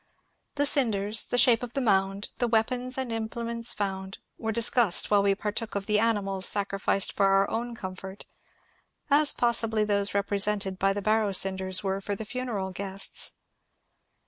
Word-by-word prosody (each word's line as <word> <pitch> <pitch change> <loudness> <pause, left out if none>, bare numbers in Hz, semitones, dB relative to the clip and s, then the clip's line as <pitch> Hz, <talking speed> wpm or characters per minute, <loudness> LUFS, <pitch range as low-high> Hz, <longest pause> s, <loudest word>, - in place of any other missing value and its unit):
The 285 0 +1
cinders, 220 -6 +2
the 245 - -1
shape 245 -3 +4
of 245 -1 -6
the - - -1
mound, 195 -4 0
the 245 - +1
weapons 245 +3 0
and 260 -3 -3
implements 230 +1 -2
fotmd, 190 -1 -4 0.2
were 220 -1 -2
discussed 230 -4 +2
while 205 -1 +5
we 200 0 +2
partook 215 +2 -4
of 200 -1 -3
the 210 0 +1
animals 200 -4 +1
sacrificed 195 -1 +1
for 195 - +2
our 195 0 +3
own 235 +1 -3
comfort, 190 -1 -8 0.5
— - - -36
as 295 - +3
possibly 225 -2 +1
those 200 -1 -1
represented 200 -1 0
by 195 0 +2
the 205 0 -5
barrow 215 0 +2
einders 190 -1 +2
were 195 0 -2
for 205 +1 -3
the 220 - -7
funeral 220 -6 -4
guests. 195 +1 -4
205 Hz, 165 wpm, -27 LUFS, 195-230 Hz, 0.5 s, while